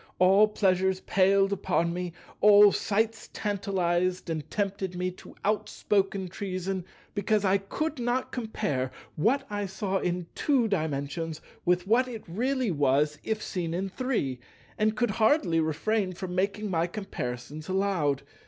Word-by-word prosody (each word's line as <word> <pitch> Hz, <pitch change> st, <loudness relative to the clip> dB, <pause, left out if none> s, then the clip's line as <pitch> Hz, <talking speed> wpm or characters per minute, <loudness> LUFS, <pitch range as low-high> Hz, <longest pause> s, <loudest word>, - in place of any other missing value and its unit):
All 195 Hz, +4 st, +6 dB
pleasures 190 Hz, -2 st, +1 dB
palled 195 Hz, +1 st, +3 dB
upon 175 Hz, -3 st, 0 dB
me; 180 Hz, -1 st, -4 dB, 0.3 s
all 205 Hz, 0 st, +8 dB
sights 220 Hz, +3 st, -1 dB
tantalized 185 Hz, -4 st, 0 dB
and 155 Hz, -3 st, -4 dB
tempted 195 Hz, -2 st, -2 dB
me 180 Hz, +1 st, -1 dB
to 180 Hz, -, -14 dB
outspoken 200 Hz, -2 st, 0 dB
treason, 185 Hz, 0 st, -4 dB, 0.3 s
because 210 Hz, 0 st, +1 dB
I 195 Hz, +1 st, +3 dB
could 305 Hz, +9 st, -3 dB
not 245 Hz, +2 st, -1 dB
compare 210 Hz, -, -2 dB, 0.3 s
what 260 Hz, -, +2 dB
I 205 Hz, -1 st, -3 dB
saw 195 Hz, 0 st, -2 dB
in 180 Hz, -1 st, -1 dB
Two 265 Hz, -6 st, +2 dB
Dimensions 155 Hz, -3 st, -2 dB, 0.3 s
with 180 Hz, 0 st, +2 dB
what 240 Hz, +5 st, +3 dB
it 230 Hz, -3 st, -7 dB
really 250 Hz, +5 st, 0 dB
was 145 Hz, 0 st, +2 dB
if 220 Hz, -1 st, -2 dB
seen 170 Hz, -3 st, -3 dB
in 190 Hz, +2 st, -2 dB
Three, 190 Hz, -, -2 dB, 0.4 s
and 215 Hz, +1 st, +1 dB
could 240 Hz, -2 st, +1 dB
hardly 220 Hz, -, +3 dB
refrain 185 Hz, +6 st, 0 dB
from 180 Hz, 0 st, -6 dB
making 200 Hz, +2 st, -1 dB
my 165 Hz, -1 st, +1 dB
comparisons 150 Hz, -, -5 dB
aloud. 185 Hz, -8 st, +1 dB
190 Hz, 140 wpm, -28 LUFS, 175-210 Hz, 0.4 s, all